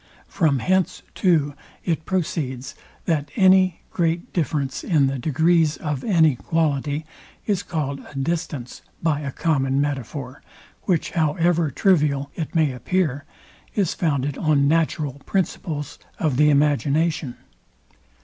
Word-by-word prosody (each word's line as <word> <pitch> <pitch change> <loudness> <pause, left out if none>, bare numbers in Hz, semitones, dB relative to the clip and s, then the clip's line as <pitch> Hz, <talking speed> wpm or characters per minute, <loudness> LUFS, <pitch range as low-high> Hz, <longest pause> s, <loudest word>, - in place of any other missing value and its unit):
From 155 -7 +1
hence 185 +5 0
too 155 -6 +2 0.3
it 160 -2 -1
proceeds, 140 -8 -2 0.3
that 150 -4 0
any 185 -2 +4
great 170 0 -1
difference 145 -5 -1
in 155 -6 +3
the 135 0 -1
degrees 160 +3 +2
of 145 -4 -3
any 160 - +4
quality 150 0 -1 0.4
is 200 -3 0
called 150 -7 -3
a - - -14
distance 140 -3 -3 0.2
by 155 -3 +2
a 140 -2 -4
common 135 -3 +1
metaphor, 140 -1 -3 0.4
which, 175 -5 0
however 165 0 +2
trivial 145 -4 +2
it 160 0 -5
may 155 -4 +3
appear, 145 +2 -1 0.5
is 195 -6 +1
founded 145 -4 -1
on 145 -3 +3
natural 150 -3 0
principles 155 -6 -2 0.2
of 150 -6 0
the 150 +1 +5
imagination. 145 0 +1
150 Hz, 120 wpm, -23 LUFS, 140-170 Hz, 0.5 s, the